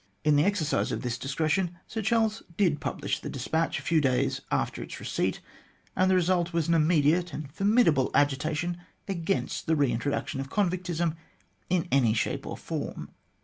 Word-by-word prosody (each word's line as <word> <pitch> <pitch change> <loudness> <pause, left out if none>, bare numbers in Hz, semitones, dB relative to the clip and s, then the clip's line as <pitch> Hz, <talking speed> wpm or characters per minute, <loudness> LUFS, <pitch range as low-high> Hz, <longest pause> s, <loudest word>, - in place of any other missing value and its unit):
In 150 -1 +4
the 145 - +4
exercise 190 -7 +1
of - - -3
this 120 0 -2
discretion 160 +6 0
Sir 220 - -4
Charles 220 0 +1 0.2
did 175 -8 +2
publish - - -2
the - - -6
despatch 160 +1 -1
a - - -6
few 165 -2 +2
days 130 -3 +1
after - - -1
its - - -7
receipt, - - -1 0.5
and 185 0 +3
the 190 - +4
result 175 -1 +2
was 165 -2 +1
an 170 - +3
immediate 165 +1 +3
and 145 -2 -6
formidable 195 - +3
agitation 150 +5 +1 0.3
against 190 -1 -2
the 160 - +3
re 140 -4 +2
intro 120 +4 -1
duction 140 - -3
of 135 0 -4
convictism 175 -3 0 0.5
in 175 -2 +1
any 125 -5 +4
shape 110 - -1
or - - -5
form. - - -5
165 Hz, 175 wpm, -28 LUFS, 145-185 Hz, 0.5 s, In